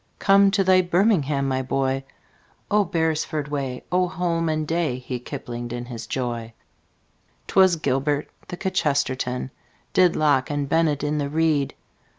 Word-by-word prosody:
Come 195 0 +5
to 195 - +3
thy 185 0 +5
birmingham, 175 -7 +2
my 130 0 0
boy! 135 0 -1 0.7
Oh, 210 0 +4
beresford 160 -3 -1
way! 135 -3 -3
Oh, 180 0 +2
holman 165 -3 -1
day!" 160 -5 -1
He 125 0 -5
kiplinged 120 -2 -6
in 120 0 -5
his 115 -2 -7
joy. 120 -3 -3 0.9
'Twas 190 -2 +4
gilbert. 145 0 0 0.2
The 180 - -6
kchesterton 140 -8 -1 0.4
Did 180 -2 +4
locke 145 -4 +2
and 145 -1 -2
bennett 155 -1 +1
in 150 0 0
the 140 -1 -2
reed. 155 -2 +1
145 Hz, 140 wpm, -23 LUFS, 130-170 Hz, 0.9 s, Come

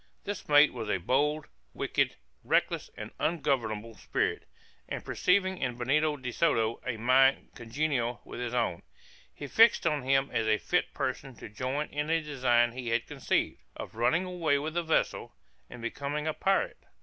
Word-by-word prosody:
This 205 -5 -6
mate 145 +1 +6
was 115 -4 -5
a 100 - +2
bold, 145 - 0 0.3
wicked, - - 0 0.3
reckless - - +1
and - - -7
ungovernable 115 -9 -1
spirit, - - -2 0.4
and - - -5
perceiving 190 0 +1
in 125 -2 -2
Benito 150 +5 +1
de 125 -2 -5
Soto 115 -7 +1
a 120 -3 -3
mind 130 +4 +4
congenial 120 0 -2
with - - -8
his 120 -1 -3
own, 115 -9 -1 0.5
he 145 - -8
fixed 225 - +5
on 150 -1 +1
him 135 +1 +1
as 110 - 0
a 110 0 +3
fit - - 0
person 135 -2 -3
to 110 - -10
join 130 +8 -3
in 150 +1 -3
a 165 0 +3
design 125 -6 +2
he 125 0 -7
had 115 0 0
conceived, - - -1 0.2
of - - -7
running 140 +11 +1
away 170 -5 +1
with 155 +2 -4
the 175 - 0
vessel, 160 - -1 0.3
and 120 - -10
becoming 140 +5 -3
a 155 - 0
pirate. 195 +4 0
135 Hz, 170 wpm, -29 LUFS, 120-155 Hz, 0.5 s, mate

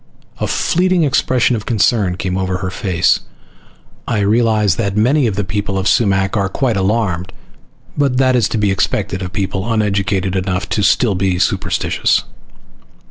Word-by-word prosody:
A - - -1
fleeting 180 -1 +1
expression 130 -3 +1
of 110 -2 -6
concern 105 -5 +1
came 90 0 -3
over 95 -1 -1
her. 95 -1 -4 1.4
"I 115 -3 0
realize 105 -2 +2
that 100 -3 -2
many 130 +5 +3
of 105 - -2
the 100 - -1
people 100 0 -3
of 95 0 -1
Sumac 95 -2 +2
are 100 -2 0
quite 130 -2 -1
alarmed, 95 -2 -1 0.6
but 140 -3 +1
that 130 -1 +3
is 115 -4 +2
to - - -2
be 105 -2 +1
expected 95 0 -1
of 90 - -3
a - - -8
people 95 +2 -3
uneducated 100 -3 0
enough 95 0 -2
to 105 - 0
still 110 +1 +2
be 95 -1 0
superstitious." - - 0
100 Hz, 160 wpm, -16 LUFS, 95-115 Hz, 1.4 s, many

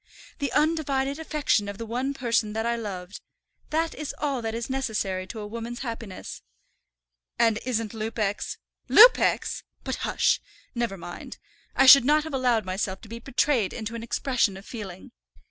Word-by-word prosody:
"The 280 - -1
undivided 290 -2 +1
affection 295 -10 0
of 200 - -6
the 230 - -5
one 255 +5 -2
person 230 -4 0
that 220 +1 -2
I 235 0 +1
loved. 195 -4 -6 0.5
That 325 +1 0
is 300 -1 -6
all 280 -4 -1
that 225 0 -3
is 230 0 -3
necessary 215 -8 -2
to 225 - -7
a - - -5
woman's 230 +2 -6
happiness." 230 -6 -6 1.0
"And 225 -2 +3
isn't 225 -3 -1
Lupex 215 -2 -2 0.2
" - - -41
"Lupex! - - +6 0.2
But, - - -3
hush, - - +1 0.3
never 235 -5 -2
mind. 175 0 -9 0.4
I 270 - +5
should 265 -1 +10
not 300 +3 +3
have 315 -2 -7
allowed 245 -5 +2
myself 190 0 -2
to 220 - -13
be 230 +1 -7
betrayed 245 -4 +1
into 225 0 -5
an 230 - -5
expression 235 -3 0
of 195 - -12
feeling. 195 -6 -8
230 Hz, 165 wpm, -26 LUFS, 210-270 Hz, 1.0 s, should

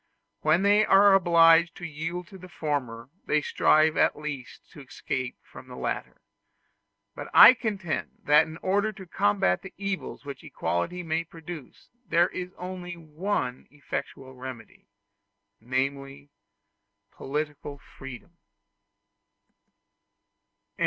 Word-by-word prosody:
When 155 +5 +3
they 205 +1 +5
are 200 -1 +6
obliged 170 -2 +5
to 175 - -8
yield 165 +3 -5
to 190 - -12
the 185 +1 -12
former, 130 -7 -4 0.2
they 150 -1 +2
strive 155 +1 +3
at - - +3
least 150 -4 -7
to 145 - -12
escape 130 -1 -5
from - - -14
the - - -10
latter. - - -4 0.9
But - - -8
I 255 - +11
contend 205 -9 -3
that 150 +2 +5
in 160 0 -9
order 205 +3 +1
to 190 -1 -11
combat 100 - +1
the 190 - -11
evils 195 -6 -5
which 140 -1 -8
equality 175 - -3
may 165 0 -1
produce, 165 -3 -11 0.2
there 170 +2 +3
is 180 -1 -6
only 180 -1 -7
one 155 -5 -3
effectual 135 -2 -7
remedy 125 -4 -10 0.7
namely, 140 +3 -3 0.8
political 145 0 -5
freedom. 135 +5 -12
160 Hz, 120 wpm, -27 LUFS, 140-180 Hz, 0.9 s, I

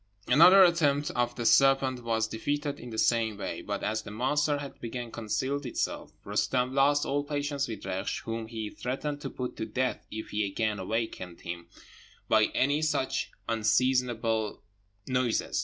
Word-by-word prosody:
Another 180 +9 +8
attempt 150 -5 +3
of 120 0 -1
the 120 - -4
serpent 135 -1 +4
was 115 -1 0
defeated 145 +6 -2
in 125 - -9
the 110 - -6
same 110 -2 +2
way; - - -4
but - - -4
as 110 0 -1
the - - -10
monster 140 +7 +1
had 145 -1 -6
again 120 0 -5
concealed 125 +6 -2
itself, 125 - -3
Roostem 125 0 0
lost 145 +2 +3
all 145 +1 0
patience 145 -1 -2
with 115 - -6
Reksh, 95 +1 -3
whom 115 0 -4
he 110 -2 -5
threatened 145 +3 -4
to 135 - -4
put 125 -1 -5
to - - -2
death 130 0 -2
if 110 +1 -6
he 105 0 -1
again 105 +1 -1
awaked 110 +4 -2
him 85 -1 -8 0.6
by 110 -1 +5
any 145 +3 +2
such 150 -4 0 0.2
unseasonable 115 -1 +1 0.4
noises. 125 -3 0
125 Hz, 160 wpm, -29 LUFS, 110-140 Hz, 0.6 s, Another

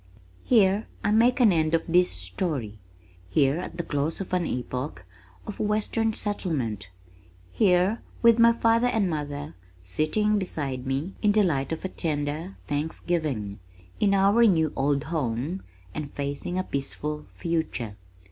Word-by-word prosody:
Here 205 -3 +3 0.2
I 205 - +2
make 235 +4 +4
an 230 -5 +6
end 160 0 +2
of 165 - 0
this 180 +1 +4
story, 105 - -3 0.5
here 140 - +2
at 180 - -6
the 170 - -2
close 150 0 -2
of 190 -2 -6
an 180 -2 +1
epoch 125 - -4 0.4
of 210 - -7
western 215 +1 +1
settlement, 135 - -2 0.6
here 190 +1 +3 0.2
with 235 0 +6
my 230 0 +7
father 230 +1 +3
and 220 -5 +1
mother 145 -2 -4 0.3
sitting 205 - +1
beside 140 -8 -3
me 140 +8 -2
in 210 -1 +4
the 215 0 +4
light 140 -7 0
of 160 +3 -3
a - - +1
tender 155 +1 -3
Thanksgiving, 145 - -2 0.4
in 200 -1 +3
our 200 +4 +5
new 160 -8 +3
old 140 +1 +1
home 150 +3 -2 0.3
and 150 -2 -5
facing 145 +5 -3
a 185 - +1
peaceful 150 +1 -4
future. 160 - -2
160 Hz, 145 wpm, -26 LUFS, 140-200 Hz, 0.6 s, my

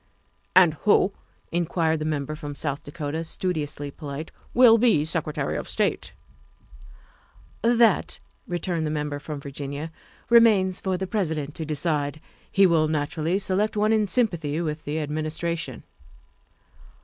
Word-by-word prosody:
' - - -42
' - - -43
"And 180 -4 +7
who," 205 -1 +4 0.4
inquired 165 -2 0
the 155 - -3
Member 155 -1 -2
from 145 -2 -7
South 140 -1 -3
Dakota, 150 +1 -4
studiously 155 -4 -3
polite, 150 +1 -7
" - - -28
will 235 -2 +7
be 215 -11 +4
Secretary 155 -3 -2
of - - -4
State?" - - -1 0.8
" - - -27
That," 230 -3 +3 0.3
returned 175 -2 -1
the - - -1
Member 150 -1 -2
from 150 0 -6
Virginia, 140 +2 -6 0.2
" - - -29
re 235 - +10
mains 195 -5 +3
for 190 -1 -1
the 190 - -3
President 160 -8 -2
to 160 - -5
decide. 150 -1 -1 0.3
He 195 - +5
will 165 -3 +3
naturally 155 +3 -1
select 200 +2 0
one 215 +1 +3
in 215 -2 +2
sympathy 170 - 0
with 155 -2 -3
the 150 +2 -2
Administration." 155 +2 -3
160 Hz, 150 wpm, -25 LUFS, 150-190 Hz, 0.8 s, re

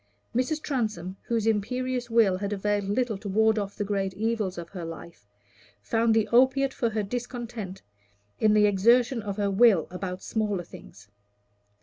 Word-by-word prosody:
Mrs. 255 +5 0
Transome, 215 - -3
whose 230 -2 -1
imperious 245 +3 -1
will 225 -5 +4
had 200 0 -3
availed 205 0 -1
little 225 -1 0
to 205 - -6
ward 220 +2 +3
off 200 -1 -4
the 210 - -2
great 195 -2 -2
evils 215 -3 -1
of 170 -1 -7
her 180 -3 -7
life, 165 -8 -9 0.5
found 225 0 +1
the 220 -2 +2
opiate 265 +2 +3
for 235 - 0
her 215 -1 -2
discontent 235 -3 -6 0.6
in 215 -1 +4
the 210 0 +5
exertion 235 +5 +3
of 200 -1 -5
her 200 -1 0
will 195 -5 +5
about 180 0 -5
smaller 210 -5 -1
things. 100 - -14
215 Hz, 160 wpm, -27 LUFS, 195-235 Hz, 0.6 s, the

